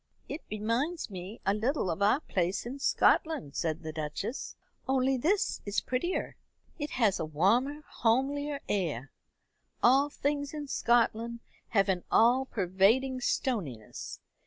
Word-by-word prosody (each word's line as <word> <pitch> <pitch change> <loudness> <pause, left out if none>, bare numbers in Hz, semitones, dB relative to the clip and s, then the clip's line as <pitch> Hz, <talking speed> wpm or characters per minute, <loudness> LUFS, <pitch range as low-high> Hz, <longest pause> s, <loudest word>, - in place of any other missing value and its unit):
"It 310 - -5
reminds 230 +9 -1
me 190 +4 -7
a 195 - +3
little 220 - 0
of 165 - -4
our 210 +8 +4
place 185 - -1
in 260 +4 -6
Scotland," 275 - +2
said 160 0 -2
the 155 - -4
Duchess, 155 - -4 0.3
"only 265 0 +2
this 345 +11 +1
is 205 0 0
prettier. 260 +9 -2 0.4
It 295 0 -2
has 220 -6 +3
a - - -1
warmer 235 - +1
homelier 280 +5 0
air. 150 - -1 0.7
All 270 +4 +5
things 285 0 -2
in 295 -1 -5
Scotland 235 -2 +1 0.3
have 200 -3 +2
an 185 -2 0
all 250 +4 +5
pervading 220 +7 +2
stoniness. 165 - -2
235 Hz, 135 wpm, -30 LUFS, 190-275 Hz, 0.7 s, All